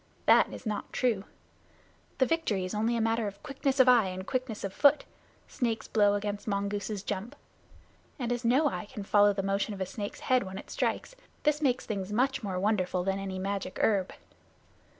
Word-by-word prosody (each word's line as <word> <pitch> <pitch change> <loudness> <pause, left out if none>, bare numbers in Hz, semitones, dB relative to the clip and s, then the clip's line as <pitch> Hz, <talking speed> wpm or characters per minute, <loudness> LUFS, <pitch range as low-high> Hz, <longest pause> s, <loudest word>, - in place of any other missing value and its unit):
That - - +5
is - - -9
not 210 -2 -3
true. 225 -6 0 0.9
The 260 - +4
victory 245 - 0
is 185 - -5
only 225 +3 +1
a - - 0
matter 225 0 +1
of 200 -1 -8
quickness 275 -1 -2
of 260 - +7
eye 240 -5 +6
and 185 0 -5
quickness 255 -4 -3
of 195 -1 -3
foot 290 +5 +4 0.4
snake's 230 -4 -2
blow 205 -2 +3
against 205 +1 -3
mongoose's 200 0 -2
jump 205 +2 -4 0.8
and 245 -4 -2
as 245 0 -1
no 260 +6 +4
eye 215 - -3
can 210 -1 -8
follow 205 +1 +5
the 195 -1 -2
motion 200 +2 -1
of - - -10
a 190 - -1
snake's 205 +2 -6
head 255 -1 +3
when 190 -1 -6
it - - -9
strikes, - - -2 0.3
this 300 0 +2
makes 260 -4 +1
things 200 -2 -4
much 260 +6 +1
more 190 -4 -3
wonderful 185 -3 0
than 195 +1 -1
any 190 -1 -4
magic 195 0 -3
herb. 195 -4 +2
210 Hz, 190 wpm, -29 LUFS, 195-245 Hz, 0.9 s, of